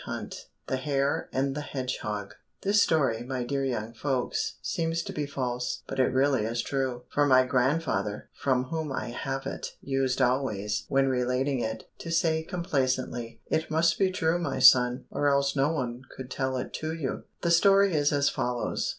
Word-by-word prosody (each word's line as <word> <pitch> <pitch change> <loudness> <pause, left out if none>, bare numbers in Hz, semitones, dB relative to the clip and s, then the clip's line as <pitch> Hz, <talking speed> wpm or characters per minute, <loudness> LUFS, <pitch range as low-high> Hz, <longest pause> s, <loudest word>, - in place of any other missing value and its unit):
187 - - -6 0.2
The 130 - -1
Hare 140 +1 0
and 135 +1 0
the 150 - -3
Hedgehog 120 -8 -4 0.3
This 205 +1 +4
story, 135 - +2
my 125 0 -3
dear 135 +3 -1
young 115 -4 -2
folks, 130 +1 -1
seems 165 0 -1
to - - -6
be 150 -1 -2
false, 125 -3 -3
but - - -5
it 130 - +5
really 130 -2 +2
is 115 +2 -1
true, 130 -3 -2
for 145 0 +3
my 130 -1 +6
grandfather, 125 -6 0
from 130 -2 +1
whom 155 +2 -4
I 130 - -3
have 135 +2 -4
it, - - -5
used 135 -2 0
always, 125 -5 0
when 135 0 +3
relating 130 +1 0
it, 110 -1 -4
to 165 - -7
say 165 -1 +2
complacently, 130 -9 -2
"It 160 - -1
must 165 +1 +2
be 190 -1 +4
true, 170 -2 +1
my 145 -6 -2
son, 125 0 +6
or 145 - +1
else 140 0 +2
no 140 +3 +2
one 125 -5 -3 0.2
could 130 -1 -8
tell 130 -1 -1
it 125 - -5
to 155 0 -2
you." 145 -5 -4 0.2
The 170 - +2
story 195 +2 +5
is 145 -2 +2
as 140 -1 +2
follows. 125 -3 -1
135 Hz, 180 wpm, -28 LUFS, 125-150 Hz, 0.3 s, my